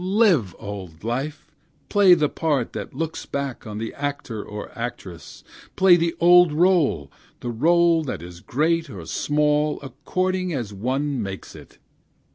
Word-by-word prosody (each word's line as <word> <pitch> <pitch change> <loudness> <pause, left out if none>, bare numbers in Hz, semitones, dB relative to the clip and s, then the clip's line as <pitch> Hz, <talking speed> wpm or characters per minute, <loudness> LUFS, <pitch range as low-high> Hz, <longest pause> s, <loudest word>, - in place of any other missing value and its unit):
Live, 185 - +2
old 95 -6 -8
life! 135 +6 -3 0.4
play 195 -3 +6
the 155 -3 +2
part 145 -6 -1
that - - -6
looks 165 0 -4
back 140 -5 -4
on 105 -1 -6
the 110 +1 -4
actor 140 -7 -4
or 105 0 -8
actress! 100 -7 -7 0.3
Play 190 -2 +6
the 170 -1 0
old 175 0 +6
role, 155 - +2 0.3
the 120 - -3
role 165 +6 +3
that 105 - -5
is 85 0 -10
great 160 - 0
or 95 -8 -8
small, 150 - +1
according 185 +6 -2
as 115 -6 -4
one 130 +6 -2
makes 95 -2 -7
it! - - -14
145 Hz, 145 wpm, -23 LUFS, 110-170 Hz, 0.4 s, play